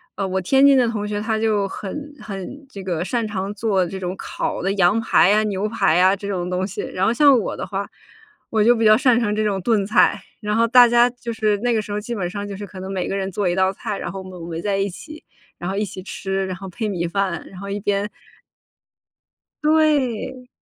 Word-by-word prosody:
呃， 195 - -2
我 190 0 -1
天 270 +9 +5
津 275 -1 +6
的 250 - +4
同 210 -2 -3
学， 205 0 -2
他 220 0 -1
就 215 -2 +1
很 285 +11 -7
很 205 +8 -7
这 200 -5 -9
个 175 -4 -2
擅 230 +4 -1
长 200 -2 -3
做 200 -3 +1
这 190 - -6
种 180 -1 -3
烤 - - -4
的 195 +2 0
羊 195 +3 +3
排 210 -4 +4
啊、 215 +1 +3
牛 205 0 -1
排 210 -8 +2
呀 185 +2 +5
这 200 0 -5
种 180 -3 -2
东 185 +1 -1
西。 200 - -5
然 185 - -2
后 225 - +3
像 280 0 +6
我 215 - -3
的 - - -5
话， 200 0 -4 0.6
我 220 -2 +1
就 240 +3 +5
比 225 - -1
较 215 0 +7
擅 250 -3 +4
长 210 -3 0
这 215 - 0
种 195 -3 0
炖 210 -1 +1
菜， 215 - +3 0.2
然 210 0 -2
后 230 0 +4
大 245 +1 +8
家 240 +1 +4
就 245 -1 -7
是 215 -2 +1
那 240 +1 +1
个 220 - +1
时 205 -1 -7
候 210 - -1
基 235 +3 -5
本 190 -6 -2
上 200 +2 -5
就 200 -1 -6
是 205 0 -7
可 185 -1 -10
能 190 +1 -6
每 185 -2 -2
个 - - -2
人 195 0 -2
做 195 0 -1
一 175 - +1
道 190 0 +2
菜， 195 +1 -5
然 - - -5
后 195 - -6
我 190 - -10
们 180 -2 -10
围 165 0 -4
在 205 -1 0
一 195 +1 0
起， 305 - -11 0.3
然 175 +2 -4
后 195 - -3
一 210 - 0
起 185 -1 -8
吃， 195 0 -3
然 185 - -3
后 195 0 -8
配 215 +4 -4
米 175 -3 -2
饭， 190 -1 -2
然 190 - -13
后 200 - -6
一 200 +1 -3
边 205 0 -1 1.5
对。 270 -5 +1
205 Hz, 270 characters per minute, -21 LUFS, 190-230 Hz, 1.5 s, 大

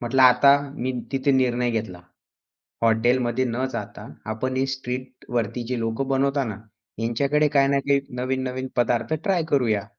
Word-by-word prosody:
म्हटलं 125 +2 +2
आता 130 +2 +7 0.2
मी 130 +2 -2 0.2
तिथे 135 +1 +1
निर्णय 125 -2 +2
घेतला. 105 -6 -4 0.8
हॉटेलमध्ये 120 +2 +2
न 125 +2 -1
जाता, - - -6 0.2
आपण 130 +4 -3
हे 135 - +2
स्ट्रीटवरती 125 -2 -4
जी 125 -1 -2
लोक 115 +2 -2
बनवतात 135 0 +1
ना, 105 -3 -5 0.4
यांच्याकडे 140 +6 +1
काही 135 0 +5
ना 140 0 +2
काही 140 -1 +4 0.2
नवीन-नवीन 130 0 -2
पदार्थ 120 +4 +1
ट्राय 185 -4 +1
करूया. 115 -8 +1
125 Hz, 145 wpm, -24 LUFS, 120-135 Hz, 0.8 s, आता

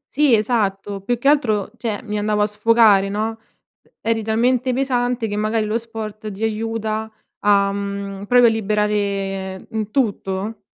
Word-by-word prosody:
Sì 285 -4 +5
esatto, 205 -3 -1
più 240 +5 -1
che 245 - -2
altro, 220 -9 +2
cioè 225 -4 -3
mi 210 -2 -3
andavo 210 0 +1
a - - +4
sfogare, 210 -2 +4
no. 220 +2 -2 0.6
Eri 225 0 0
talmente 245 +4 +1
pesante 245 -2 0
che 205 - -3
magari 215 +1 0
lo 215 +2 0
sport 220 -2 -7
ti 200 +3 -6
aiuta 220 0 -2 0.3
a, 200 -1 +3
mhmm, 200 0 -5
proprio 245 +3 +5
a - - +4
liberare 200 -3 -1
in 220 -2 -3
tutto. 210 -3 -1
215 Hz, 150 wpm, -20 LUFS, 205-230 Hz, 0.6 s, Sì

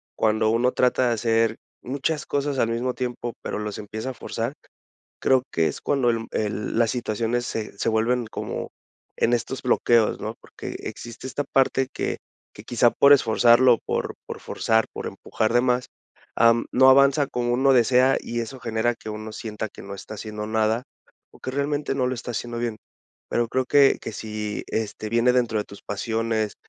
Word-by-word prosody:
cuando 110 0 +2
uno 120 +3 +2
trata 125 0 +2
de 120 - +2
hacer 115 -1 +1 0.2
muchas 140 +4 -2
cosas 140 -1 -1
al 115 - +3
mismo 120 +2 -1
tiempo, 120 -1 -4
pero - - -4
los 105 -1 -4
empieza 110 +4 -5
a - - -4
forzar, 120 +1 -4 0.7
creo 130 -1 +3
que 80 -1 +2
es - - -4
cuando 135 -4 +1
el 115 -1 -3
el 105 +1 -2
las 115 -1 +3
situaciones 120 0 -1
se 105 -4 -5
se - - -2
vuelven 115 +1 +1
como - - -4 0.5
en 120 - +2
estos 120 +3 -2
bloqueos, 120 -3 +3
¿no? - - -4
Porque - - -8
existe 120 +1 -8
esta 145 +2 -2
parte 135 -1 +2
que - - -2 0.4
que - - -12
quizá 120 0 +3
por 140 +1 +6
esforzarlo 120 -1 +5
por - - -2
por - - -6
forzar 110 0 +1
por - - -5
empujar 110 +1 -2
de 120 - +5
más, 125 0 +1 0.5
am 115 0 +4
no 130 +1 +7
avanza 140 +2 +5
como 120 0 -1
uno 135 +2 +4
desea 125 +2 +4
y 120 0 -3
eso 130 +3 -7
genera 115 +1 0
que - - -13
uno 110 +1 -6
sienta 110 -1 -5
que - - -12
no 100 0 -7
está 110 +2 -9
haciendo 105 0 -6
nada 110 +2 +1 0.5
o - - -18
que 130 - -5
realmente 140 0 -1
no 130 -2 +1
lo 130 - -1
está 120 - -6
haciendo 120 +1 -4
bien. 120 -2 -2 0.5
Pero 120 0 +1
creo 130 - +1
que 140 0 +5
que - - -5
si 105 -1 -4
este 110 -1 -3
viene 115 +2 +3
dentro 115 -4 +1
de - - -1
tus 100 - -13
pasiones, 110 0 -2
120 Hz, 185 wpm, -24 LUFS, 110-125 Hz, 0.7 s, no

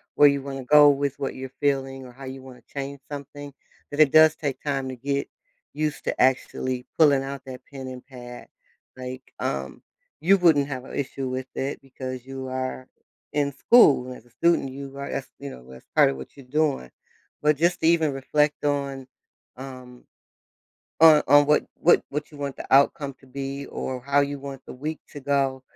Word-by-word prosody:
where 145 - +8
you 140 -1 +2
wanna 135 -2 -6
go 145 +2 +8
with 140 -1 0
what 135 - -2
you're 130 0 -6
feeling, 135 -2 0
or 125 - -11
how 135 +2 -11
you 130 0 -7
wanna 130 -2 -13
change 140 0 -4
something, 145 0 -8 0.4
that 145 - -5
it 150 -3 +6
does 155 0 +7
take 140 -4 -4
time 135 -2 -2
to 130 - -5
get 140 +2 -2 0.4
used 150 0 -2
to - - -1
actually 130 0 +1
pulling 140 -4 +5
out 140 0 -6
that 130 -1 -8
pen 135 -2 -7
and 130 -1 -8
pad. 125 -2 -10 0.5
Like, 130 0 -7 0.2
um, 65 0 -3 0.4
you 195 +5 +5
wouldn't 160 -6 +4
have 130 -3 -5
a - - -11
issue 135 -1 -3
with 130 0 -4
it 135 +2 -3
because 130 -2 -7
you 135 0 -6
are 130 0 -4 0.4
in 145 -1 0
school. 140 - +5
And 125 0 -7
as - - -18
a - - -23
student, 170 +2 +2
you 140 0 -8
are 140 0 -5
that's, 135 - -4
you 140 0 -6
know, 60 - -11
that's 65 - -14
part - - +6
of 70 - -4
what 65 - -10
you're 140 - -13
doing. 140 - 0 0.5
But 150 0 +3
just 170 +3 +2
to 160 - +3
even 160 -3 +3
reflect 150 +2 0
on, 140 -2 -1 0.5
um, 130 -2 -10 1.0
on 155 -2 +9
on 145 +1 +7
what 150 +1 +3
what 170 - +4
what 150 +2 -4
you 150 - -12
want 140 -1 -4
the - - -7
outcome 140 +1 +4
to 135 - -20
be 140 +1 -5
or 130 -1 -5
how 140 +2 +2
you 140 0 -2
want 135 -1 -8
the - - -9
week 150 +5 -5
to 145 - -8
go, 135 -1 0
135 Hz, 200 wpm, -25 LUFS, 130-145 Hz, 1.0 s, on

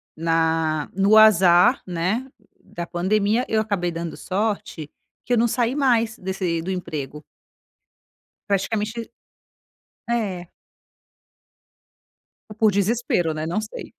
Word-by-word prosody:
na 160 -1 0
no 200 +3 +4
azar 190 0 +6
né, 185 +9 -2 0.4
da 170 - -7
pandemia 205 +7 0
eu 220 - +2
acabei 200 -5 -2
dando 170 0 -5
sorte, 195 -6 -3 0.4
que 245 - -1
eu - - +3
não 235 +1 +3
saí 235 +2 0
mais 235 -6 +1
desse 185 -3 -2
do 175 - -6
emprego. 150 -5 -5 1.3
Praticamente 215 +3 -2 1.0
é. 195 -7 -2 2.0
Ou - - -9
por 220 -2 +4
desespero 200 -5 0
né 155 0 -4
não 215 - 0
sei. - - -8
195 Hz, 110 wpm, -22 LUFS, 170-220 Hz, 2.0 s, azar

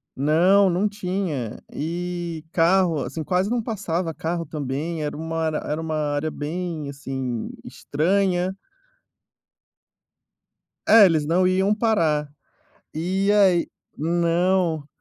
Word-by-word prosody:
Não, 175 +8 +4
não 185 +4 +1
tinha. 180 - -3 0.2
E 170 0 -4
carro, 170 -3 +3
assim, 160 - -5
quase 185 +5 0
não 240 0 0
passava 180 -7 -2
carro 165 +1 -3
também, 150 +2 -4
era 150 0 -4
uma 160 0 -2
era 155 -1 -1
era 155 +2 -3
uma 160 -1 -3
área 150 0 -1
bem, 155 0 -4
assim, 135 -4 -4 0.2
estranha. 185 +4 0 2.3
É, 220 -2 +9
eles 160 -4 +2
não 180 +4 +3
iam 190 +3 +2
parar. 165 -10 +1 0.7
E 190 +5 0
aí 190 -4 +4 0.3
não 170 0 +1
170 Hz, 110 wpm, -23 LUFS, 155-185 Hz, 2.3 s, É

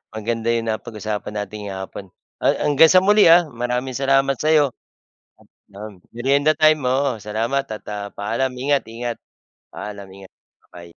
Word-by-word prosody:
Maganda 115 +1 -3
yung 115 -1 -2
napag-usapan 110 -1 -5
natin 105 0 -5
ngayong 95 -1 -6
hapon, 100 - -10 0.4
ha - - +1 0.2
hanggang 150 +2 +6
sa 185 0 +6
muli 210 +1 +5
ha. 170 -1 +6
Maraming 125 +1 -3
salamat 135 0 +2
sa 155 - -1
'yo. 145 -3 +4 1.0
Nam 100 -1 -10
merienda 140 +5 +2
time, 155 -2 +3
oo, 130 -2 0
salamat 115 +6 -1
at, 110 -1 -7
ah, 100 -1 -5
paalam. 115 +6 -2
Ingat-ingat. 120 -3 -2 0.6
Paalam. 100 -2 -8
Ingat. 95 0 -14 0.4
Babay. 85 -1 -13
120 Hz, 150 wpm, -21 LUFS, 105-140 Hz, 1.0 s, hanggang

